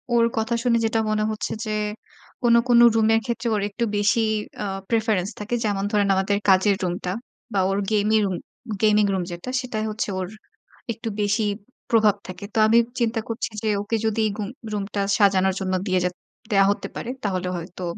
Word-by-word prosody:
ওর 230 -1 +5
কথা 225 +2 0
শুনে 240 -2 +3
যেটা 225 0 +1
মনে 215 0 +1
হচ্ছে 215 - -3
যে, 215 - -3 0.7
কোন, 235 -1 +5 0.2
কোন 235 - +6 0.2
রুমের 225 0 +4
ক্ষেত্রে 235 0 -2
ওর 205 - 0
একটু 225 +4 -3
বেশি 205 +3 +3 0.4
আ - - -2 0.2
preference 220 -4 +1
থাকে। 210 +3 -2
যেমন 200 -2 0
ধরেন 205 -2 +2
আমাদের 195 +1 +1
কাজের 190 +2 +5
রুমটা 180 0 -2 0.4
বা 195 - +2
ওর 195 - 0
gami 215 +1 +3
room 190 -2 -1 0.5
gaming 210 -1 +5
room 185 -2 0
যেটা 175 +9 -6
সেটাই 220 -4 -3
হচ্ছে 215 -1 -3
ওর 185 - -2 0.7
একটু 225 +1 -5
বেশি 210 +2 +1 0.5
প্রভাব 215 -3 +5
থাকে। 185 +2 -7
তো - - -4
আমি 225 +2 +5 0.2
চিন্তা 230 -1 +1
করছি 230 0 -2
যে, 220 - +1
ওকে 225 +2 -2
যদি 220 0 +1 0.2
গুম 210 -1 -3 0.2
রুমটা 200 0 -2 0.2
সাজানোর 190 -2 +3
জন্য 185 0 -1
দিয়ে 185 0 +2
জে 180 - +2 0.4
দেয়া 195 -1 +5
হতে - - -3
পারে, 240 - -5
তাহলে 185 -2 -1
হয়তো 175 +2 -8
210 Hz, 180 wpm, -23 LUFS, 195-225 Hz, 0.7 s, কোন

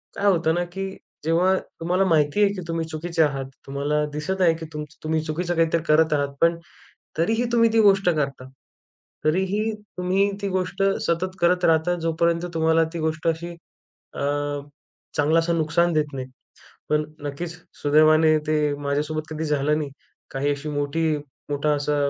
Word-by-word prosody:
काय 200 - -2
होतं 165 -2 +2
ना 175 - +1
की 195 0 -3 0.4
जेव्हा 175 +4 +3 0.3
तुम्हाला 180 +3 +2
माहिती 160 +3 +3
आहे 200 0 +3
की 185 - -5
तुम्ही 165 -1 -2
चुकीचे 160 +1 0
आहात. 135 -2 -1 0.2
तुम्हाला 145 +2 0
दिसत 185 +6 -2
आहे 165 -2 +5
की 160 - -7
तुमचं 150 0 -8
तुम्ही 155 0 0
चुकीचं 170 +3 -2
काहीतरी 165 0 +2
करत 155 +1 +4
आहात. 140 -1 -1
पण 170 0 +4 0.6
तरीही 225 +8 +2
तुम्ही 230 -1 +5
ती 225 - +5
गोष्ट 195 -2 +4
करता. 140 -5 -2 0.8
तरीही 190 +7 +1 0.3
तुम्ही 190 +3 +1
ती 200 - -1
गोष्ट 185 +1 -1 0.2
सतत 185 +3 -1
करत 180 +1 +3
राहता 165 +2 +3
जोपर्यंत 170 +1 +1
तुम्हाला 160 0 +3
ती 170 - -4
गोष्ट 155 0 -2
अशी 170 +1 -2 0.6
अ, - - -7 1.0
चांगलासा 165 +3 +3
नुकसान 165 +2 +2
देत 155 -1 +2
नाही. 130 -1 -5 0.6
पण 150 0 +2 0.2
नक्कीच 145 +4 -5 0.3
सुदैवाने 155 +1 +5
ते 150 -1 +1
माझ्यासोबत 150 +2 -1
कधी 155 +1 -3
झालं 150 0 +1
नाही. 145 -2 -3 0.4
काही 140 +2 -1
अशी 145 +2 -5
मोठी 145 +2 -1 0.5
मोठा 145 +1 +1
असा 145 +1 -1
160 Hz, 160 wpm, -24 LUFS, 150-175 Hz, 1.0 s, आहे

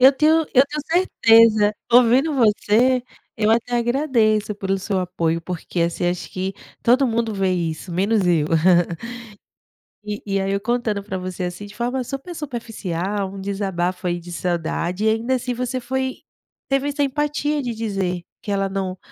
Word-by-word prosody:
Eu 265 +2 +8
tenho 315 +4 +3
eu 260 +1 +7
tenho 300 0 -4
certeza, 225 - +5 0.2
ouvindo 250 +5 +5
você, 240 +2 +3 0.3
eu 215 -1 +2
até 235 +2 +1
agradeço 235 -4 +1
pelo 195 -1 -1
seu 195 0 -2
apoio 170 -2 -1
porque, 175 0 -4
assim, 170 +1 -1
acho 175 0 -3
que 190 +1 -3 0.3
todo 255 +3 +4
mundo 230 -1 0
vê 190 -1 +1
isso 170 0 -3
menos 200 +2 +1
eu. 165 -4 +3 1.6
E 210 0 -5
e 195 -1 0
aí, 195 0 -1
eu 200 0 -1
contando 225 -2 -1
para 190 -2 -4
você, 185 0 -5
assim, 180 +3 -6
de 205 +1 -12
forma 245 +3 -1
super 275 +8 -6
superficial, 205 - -4
um 195 - -7
desabafo 185 -2 -2
aí, 175 0 -1
de 175 +1 -11
saudade 175 +3 -2
e - - +5
ainda 230 +4 +1
assim, 250 0 -2
você 250 +1 -2
foi 260 +1 -2 0.5
teve 275 +1 +1
essa 290 0 0
empatia 295 +1 -1
de 245 -3 -3
dizer 195 -5 -2 0.2
que 205 - -5
ela 195 -1 0
não, 190 -1 -3
215 Hz, 165 wpm, -21 LUFS, 185-250 Hz, 1.6 s, Eu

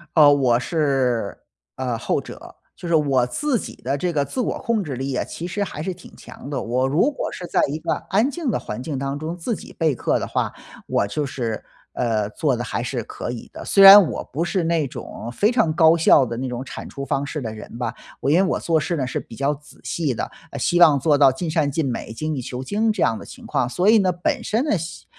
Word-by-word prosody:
呃， 150 -3 +8
我 125 -4 +3
是， 130 - 0 0.4
呃， 125 -3 -2
后 - - 0
者， - - -11 0.2
就 - - -11
是 170 -1 +2
我 140 -5 +3
自 265 - -1
己 - - -7
的 135 +4 -2
这 180 +4 -1
个 145 -4 0
自 255 - -3
我 - - -2
控 230 -4 0
制 145 -6 -5
力 135 +1 -3
啊， - - 0
其 170 - -6
实 205 +3 -2
还 155 -6 -6
是 185 +3 -3
挺 180 - -15
强 140 - -11
的。 145 - -2
我 125 +3 0
如 150 - +2
果 280 - -4
是 180 - -7
在 - - +2
一 150 - -2
个 - - -1 0.2
安 215 +7 +3
静 295 -3 -2
的 - - -1
环 105 +4 -6
境 145 -3 -4
当 140 +1 -3
中 160 +4 -5
自 215 +7 -2
己 - - -11
备 160 -5 +2
课 - - 0
的 - - -4
话， - - -1 0.4
我 - - +1
就 145 +9 -2
是， 120 -5 -4 0.3
呃， 110 -4 0
做 135 -2 0
得 120 - -3
还 115 0 -3
是 125 -1 -3
可 - - -5
以 120 - -8
的。 - - -8
虽 195 - +3
然 195 -2 +11
我 - - -4
不 155 +5 0
是 175 0 -1
那 165 -2 +1
种 120 -2 -7
非 205 - +2
常 225 -10 +2
高 160 0 +6
效 160 -4 +5
的 115 -1 -4
那 130 0 -3
种 125 +1 -4
产 - - -8
出 140 - -6
方 140 0 -1
式 150 +2 -4
的 110 -3 -4
人 110 +1 -10
吧， 125 - -3 0.2
我 135 - -1
因 150 - +4
为 190 - +4
我 190 - 0
做 165 -1 +1
事 170 +3 -2
呢 130 -3 -1
是 - - -3
比 115 - -11
较 140 +2 +1
仔 150 +1 -15
细 155 -6 -1
的， 110 - -4 0.2
呃， 140 - -6
希 175 +7 +2
望 150 -5 +7
做 145 +2 +3
到 140 -2 +6
尽 160 +6 -4
善 155 -3 +1
尽 145 -1 -1
美， 120 - -5
精 155 +6 -3
益 130 - -3
求 125 +1 -6
精 215 +9 +1
这 210 -4 -3
样 115 - +2
的 100 - -10
情 - - -12
况。 125 - 0
所 180 +9 +2
以 225 - +7
呢， 185 -2 +2
本 235 - -2
身 225 +3 0
呢， 295 - +1
效 165 +1 -7
145 Hz, 280 characters per minute, -22 LUFS, 130-175 Hz, 0.4 s, 然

